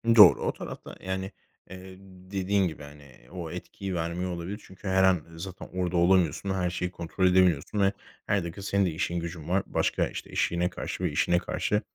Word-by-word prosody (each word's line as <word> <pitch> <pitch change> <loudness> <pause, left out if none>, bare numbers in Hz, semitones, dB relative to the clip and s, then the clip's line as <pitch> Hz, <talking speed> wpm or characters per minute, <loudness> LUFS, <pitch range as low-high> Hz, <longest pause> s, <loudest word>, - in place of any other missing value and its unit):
Doğru. 105 - +9
O - - 0
tarafta, - - -8
yani, 95 +1 -3 0.4
eee, 95 0 -10 0.4
dediğin 95 0 +2
gibi, 80 -2 -7
hani, 75 +1 -12
eee, 65 -3 -18
o 85 -3 -6
etkiyi 95 -2 -5
vermiyor 85 +2 -2
olabilir. 90 +5 -5
Çünkü 95 +1 -11
her 95 0 +3
an 95 -3 +4
zaten 90 +3 -8
orada 90 -1 -1
olamıyorsun. 90 0 +3
Her 90 -2 0
şeyi 90 0 -3
kontrol 90 +2 0
edemiyorsun 90 +1 +3
ve 100 +1 +3 0.3
her 100 -3 +2
dakika 85 +4 -6
senin 100 0 +1
de 90 - 0
işin 85 +2 -1
gücün 85 -1 -6
var. 95 +1 +2
Başka - - 0
işte, - - -8
eşine 85 +1 +1
karşı - - -5
ve - - +1
işine 85 - +2
karşı 105 +3 -1
90 Hz, 190 wpm, -28 LUFS, 85-95 Hz, 0.4 s, Doğru